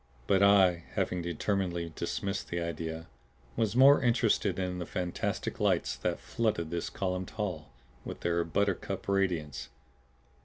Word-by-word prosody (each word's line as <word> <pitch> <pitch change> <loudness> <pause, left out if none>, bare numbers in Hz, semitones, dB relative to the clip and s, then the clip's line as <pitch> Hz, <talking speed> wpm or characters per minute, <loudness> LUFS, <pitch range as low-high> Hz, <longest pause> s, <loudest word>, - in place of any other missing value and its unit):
But 95 +6 +3
I, 95 -4 +5
having 90 - 0
determinedly 85 -1 -2
dismissed 100 0 -3
the 85 - -2
idea, 80 -1 -4 0.5
was 110 -1 0
more 135 +3 +7
interested 115 -5 +2
in 90 -1 -2
the 85 - -5
fantastic 90 -1 -3
lights - - +1
that - - -2
flooded 105 -8 -1
this 85 -1 -2
columned 90 -1 -3
hall 90 -8 -4 0.3
with - - -7
their 85 0 +1
buttercup 100 +4 -1
radiance. 90 -8 -1
90 Hz, 130 wpm, -30 LUFS, 85-100 Hz, 0.5 s, more